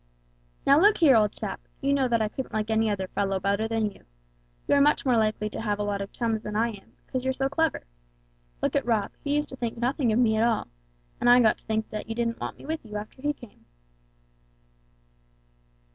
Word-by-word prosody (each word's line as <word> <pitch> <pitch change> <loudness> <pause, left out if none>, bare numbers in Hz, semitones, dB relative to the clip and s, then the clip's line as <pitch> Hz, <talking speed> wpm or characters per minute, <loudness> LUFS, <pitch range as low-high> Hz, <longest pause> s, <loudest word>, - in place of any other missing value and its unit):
"Now 280 +2 +6
look 415 +2 +5
here, 295 -7 +6
old 210 -2 +4
chap! - - -6 0.2
You 280 0 +1
know 270 -2 +2
that 230 -2 +2
I - - +1
couldn't 255 +4 -6
like 215 0 -1
any 220 0 +2
other 190 -2 -2
fellow 195 -1 -1
better 200 +3 0
than 225 -2 0
you. - - -19 0.6
You're 285 0 +4
much 295 +1 +3
more 255 - +3
likely 215 -1 +1
to - - -5
have 210 -2 -1
a 205 - -2
lot 205 -1 -2
of 200 - -6
chums 225 -2 -1
than 210 0 -6
I 230 +2 +2
am, 205 -4 -12
because 255 -1 -3
you're 260 0 0
so 270 0 0
clever. 320 +2 0 0.8
Look - - 0
at - - +2
Rob; 220 -3 0
he 290 -1 0
used 295 0 0
to - - -7
think 235 -3 -4
nothing 245 0 +1
of 215 - +2
me 225 -3 +3
at 220 - +3
all, 230 - +1 0.5
and 240 - +3
I 245 +1 +8
got 220 -3 +3
to - - -19
think 220 0 0 0.2
you 225 - -4
didn't 230 0 -1
want - - -5
me - - -13
with 320 +2 -3
you, 210 -2 -6
after 215 +5 -9
he 295 +1 +1
came." 240 -7 -14
230 Hz, 225 wpm, -26 LUFS, 215-265 Hz, 0.8 s, I